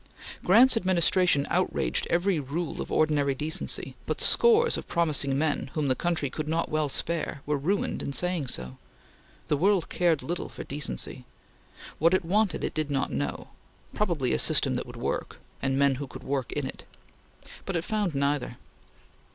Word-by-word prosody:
Grant's 240 Hz, +8 st, +6 dB
administration 180 Hz, -6 st, +3 dB
outraged -, -, 0 dB
every 175 Hz, 0 st, +2 dB
rule 150 Hz, +4 st, -4 dB
of -, -, -6 dB
ordinary 145 Hz, -3 st, +2 dB
decency, 155 Hz, +4 st, -1 dB
but -, -, -2 dB
scores 470 Hz, 0 st, +5 dB
of -, -, -6 dB
promising 150 Hz, -5 st, +1 dB
men, 150 Hz, -2 st, 0 dB
whom 150 Hz, -3 st, 0 dB
the 130 Hz, -, +3 dB
country 170 Hz, -3 st, -1 dB
could 155 Hz, -1 st, -4 dB
not 165 Hz, +2 st, -1 dB
well 155 Hz, -1 st, 0 dB
spare, 155 Hz, -1 st, -2 dB
were 150 Hz, -, 0 dB
ruined 175 Hz, +9 st, -1 dB
in -, -, -4 dB
saying 175 Hz, -1 st, -1 dB
so. 65 Hz, -, -3 dB, 0.7 s
The 150 Hz, -, +1 dB
world 190 Hz, +2 st, +2 dB
cared 170 Hz, -4 st, +1 dB
little 175 Hz, +1 st, -4 dB
for -, -, -8 dB
decency. 140 Hz, -2 st, -3 dB, 0.8 s
What 165 Hz, +4 st, +4 dB
it 185 Hz, -, -1 dB
wanted, 205 Hz, +2 st, +1 dB
it -, -, -2 dB
did 155 Hz, -1 st, -2 dB
not 135 Hz, -2 st, -1 dB
know; 70 Hz, -1 st, -3 dB, 0.4 s
probably 170 Hz, -11 st, 0 dB
a 65 Hz, -, +1 dB
system -, -, +3 dB
that -, -, -3 dB
would -, -, -10 dB
work, -, -, -3 dB, 0.2 s
and 135 Hz, 0 st, 0 dB
men 140 Hz, 0 st, +4 dB
who 140 Hz, -, -4 dB
could 130 Hz, +1 st, -10 dB
work 135 Hz, -2 st, -2 dB
it; -, -, -4 dB, 0.8 s
but 195 Hz, -, -2 dB
it 165 Hz, -, 0 dB
found 210 Hz, -7 st, -1 dB
neither. 140 Hz, -3 st, -1 dB
155 Hz, 165 wpm, -27 LUFS, 140-180 Hz, 0.8 s, Grant's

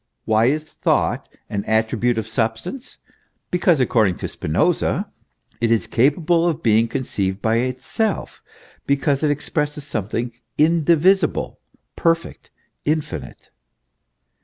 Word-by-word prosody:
Why 110 Hz, +1 st, +3 dB
is 150 Hz, +5 st, +1 dB
Thought 155 Hz, -, -1 dB, 0.2 s
an 100 Hz, -1 st, -3 dB
attribute 110 Hz, +2 st, +1 dB
of 110 Hz, -1 st, -2 dB
sub 110 Hz, -1 st, 0 dB
stance? 260 Hz, -, -8 dB, 0.5 s
Because, 175 Hz, -3 st, +3 dB
according 110 Hz, -7 st, +2 dB
to -, -, -4 dB
Spinoza, -, -, 0 dB, 0.5 s
it 115 Hz, -, +2 dB
is 115 Hz, -1 st, +2 dB
capable 165 Hz, +7 st, +2 dB
of 160 Hz, 0 st, -4 dB
being 115 Hz, 0 st, +4 dB
conceived 100 Hz, -6 st, -2 dB
by 110 Hz, +2 st, +1 dB
itself, 130 Hz, -, -2 dB, 0.5 s
because 140 Hz, 0 st, +1 dB
it 155 Hz, -, +2 dB
expresses 150 Hz, 0 st, -2 dB
something 115 Hz, -2 st, -3 dB, 0.3 s
indivisible, 165 Hz, +3 st, +3 dB, 0.4 s
perfect, 165 Hz, 0 st, -1 dB, 0.3 s
infinite. 155 Hz, 0 st, -3 dB
135 Hz, 110 wpm, -21 LUFS, 110-160 Hz, 0.5 s, being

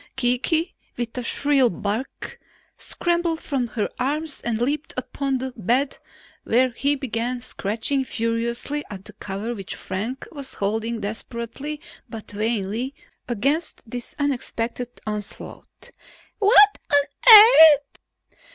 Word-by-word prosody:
Kiki, 270 Hz, +7 st, 0 dB, 0.2 s
with 240 Hz, -1 st, -4 dB
a 250 Hz, -, -3 dB
shrill 270 Hz, +1 st, +2 dB
bark, 210 Hz, +7 st, -5 dB, 0.4 s
scrambled 340 Hz, -2 st, -1 dB
from 270 Hz, -7 st, -2 dB
her 220 Hz, -2 st, -2 dB
arms 295 Hz, +4 st, -2 dB
and 235 Hz, -2 st, -1 dB
leaped 290 Hz, +6 st, -2 dB
upon 275 Hz, -1 st, -2 dB
the 260 Hz, 0 st, -5 dB
bed 250 Hz, +6 st, 0 dB, 0.4 s
where 250 Hz, +2 st, +2 dB
he 280 Hz, +5 st, 0 dB
began 245 Hz, -2 st, -3 dB
scratching 240 Hz, +4 st, -2 dB
furiously 235 Hz, +5 st, -2 dB
at 195 Hz, -1 st, -9 dB
the 210 Hz, -, -12 dB
cover 210 Hz, +3 st, -5 dB
which 195 Hz, -5 st, -6 dB
Frank 220 Hz, +8 st, -5 dB
was 280 Hz, -4 st, -8 dB
holding 225 Hz, +3 st, -2 dB
desperately 235 Hz, +7 st, -5 dB, 0.3 s
but 225 Hz, -2 st, -9 dB
vainly 220 Hz, +4 st, -2 dB, 0.3 s
against 275 Hz, +8 st, -1 dB
this 240 Hz, +1 st, -7 dB
unexpected 245 Hz, -4 st, -2 dB, 0.2 s
onslaught. 210 Hz, -1 st, -8 dB, 0.5 s
"What 415 Hz, 0 st, +6 dB
on 285 Hz, -, +4 dB
earth 320 Hz, -, +9 dB
250 Hz, 115 wpm, -23 LUFS, 225-285 Hz, 0.5 s, earth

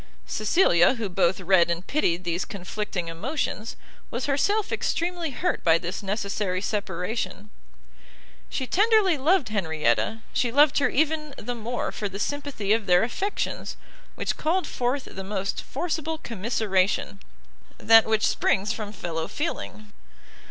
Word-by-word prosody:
Cecilia, 215 Hz, -, +3 dB
who 225 Hz, -4 st, -3 dB
both 185 Hz, 0 st, +2 dB
read 185 Hz, -2 st, +4 dB
and 170 Hz, +2 st, -2 dB
pitied 180 Hz, -, 0 dB
these 175 Hz, 0 st, -1 dB
conflicting 195 Hz, -2 st, -4 dB
emotions, 220 Hz, -, -3 dB, 0.3 s
was 240 Hz, +2 st, -3 dB
herself 405 Hz, +10 st, +1 dB
extremely 345 Hz, -1 st, -1 dB
hurt 305 Hz, +7 st, -2 dB
by 165 Hz, -1 st, +5 dB
this 175 Hz, +1 st, -5 dB
necessary 200 Hz, -2 st, -2 dB
separation. 205 Hz, +1 st, -3 dB, 1.0 s
She 265 Hz, -, -2 dB
tenderly 415 Hz, -, +4 dB
loved 320 Hz, -, +3 dB
Henrietta, 160 Hz, -, 0 dB
she 240 Hz, -, +1 dB
loved 290 Hz, +3 st, +5 dB
her 285 Hz, -, +2 dB
even 305 Hz, 0 st, 0 dB
the 245 Hz, +3 st, -4 dB
more 240 Hz, +1 st, -3 dB
for 205 Hz, -3 st, -3 dB
the 195 Hz, -, -7 dB
sympathy 275 Hz, -4 st, -1 dB
of 220 Hz, -2 st, 0 dB
their 180 Hz, +1 st, +5 dB
affections, 385 Hz, -, -3 dB, 0.4 s
which -, -, -2 dB
called 350 Hz, +4 st, +1 dB
forth 255 Hz, +3 st, -2 dB
the 190 Hz, -, -6 dB
most 195 Hz, 0 st, -3 dB
forcible 320 Hz, -2 st, -3 dB
commiseration, 200 Hz, -, -1 dB, 0.6 s
that 225 Hz, 0 st, +7 dB
which 220 Hz, -1 st, +2 dB
springs 205 Hz, +3 st, +1 dB
from 215 Hz, -3 st, -5 dB
fellow 165 Hz, -5 st, -4 dB
feeling! 215 Hz, -9 st, -5 dB
215 Hz, 135 wpm, -25 LUFS, 190-285 Hz, 1.0 s, that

